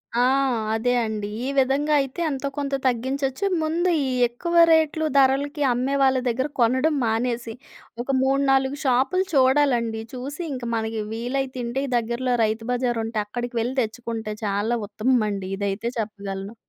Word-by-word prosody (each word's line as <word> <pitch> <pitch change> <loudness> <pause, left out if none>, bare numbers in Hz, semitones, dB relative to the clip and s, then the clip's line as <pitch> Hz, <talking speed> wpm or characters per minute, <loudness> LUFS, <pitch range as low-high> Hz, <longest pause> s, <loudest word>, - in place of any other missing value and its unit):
ఆ! 240 - +3 0.5
అదే 225 +3 +1
అండి. 215 -2 -3 0.2
ఈ - - -2
విధంగా 275 +3 +2
అయితే 270 +4 -6
ఎంతో 280 -1 -3
కొంత 280 -1 -1
తగ్గించొచ్చు. 265 - 0 0.2
ముందు 335 +3 +1 0.2
ఈ - - -1 0.2
ఎక్కువ 340 +9 -4 0.2
రేట్‌లు 315 0 +3
ధరలకి 280 +2 +2
అమ్మే 260 +3 -1
వాళ్ళ 265 -1 +4
దగ్గర 260 +4 0
కొనడం 260 +6 +3
మానేసి 230 +1 -1 0.5
ఒక 265 - -18
3,4 270 0 +2
షాపులు 265 +9 +2
చూడాలండి. 260 -4 +3
చూసి 275 +6 -6
ఇంక 255 -2 -6
మనకి 220 0 -2
వీలైతుంటే 250 +1 -3
ఈ - - -7
దగ్గరలో 240 +2 -1
రైతు 220 +1 -1
బజార్ 245 -2 0
ఉంటే 225 -1 -2
అక్కడికి 240 +3 -5
వెళ్లి 245 +3 -2
తెచ్చుకుంటే 225 -1 -4
చాలా 205 +4 0
ఉత్తమమండి. 215 -4 0
ఇదైతే 200 +3 -2
చెప్పగలను. 200 -1 -5
250 Hz, 140 wpm, -23 LUFS, 225-270 Hz, 0.5 s, వాళ్ళ